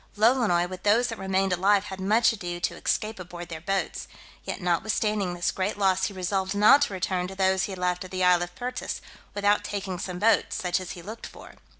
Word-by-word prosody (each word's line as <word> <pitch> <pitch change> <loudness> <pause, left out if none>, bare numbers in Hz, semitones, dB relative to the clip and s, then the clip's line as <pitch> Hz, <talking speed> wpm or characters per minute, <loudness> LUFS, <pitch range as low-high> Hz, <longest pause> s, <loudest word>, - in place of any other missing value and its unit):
Lolonois, 215 -6 +3
with 185 0 -8
those 225 +4 +3
that 225 - -6
remained 190 0 +1
alive, 195 +2 +3
had 190 -2 -7
much 220 +4 +3
ado 175 -5 -5
to - - -1
escape 215 -1 -2
aboard 175 -1 -8
their 160 -2 -6
boats: 195 +3 -2 0.4
yet - - -5
notwithstanding 200 +1 0
this 175 - 0
great 195 +2 -2
loss, 190 -2 +2
he 200 - -4
resolved 190 +1 -2
not 210 +8 +7
to 250 - +1
return 185 -1 -1
to 190 - -9
those 190 0 +2
he - - -6
had - - -7
left 180 0 -1
at 185 - -10
the 185 0 -2
isle 180 -1 +5
of 175 0 -5
Pertas, 250 +5 -4 0.3
without 205 0 +2
taking 195 -3 -4
some 180 -1 -4
boats, 225 +5 +2
such 180 0 0
as 185 -1 -6
he 175 - -10
looked 220 +5 -8
for. - - -13
190 Hz, 220 wpm, -26 LUFS, 180-205 Hz, 0.4 s, not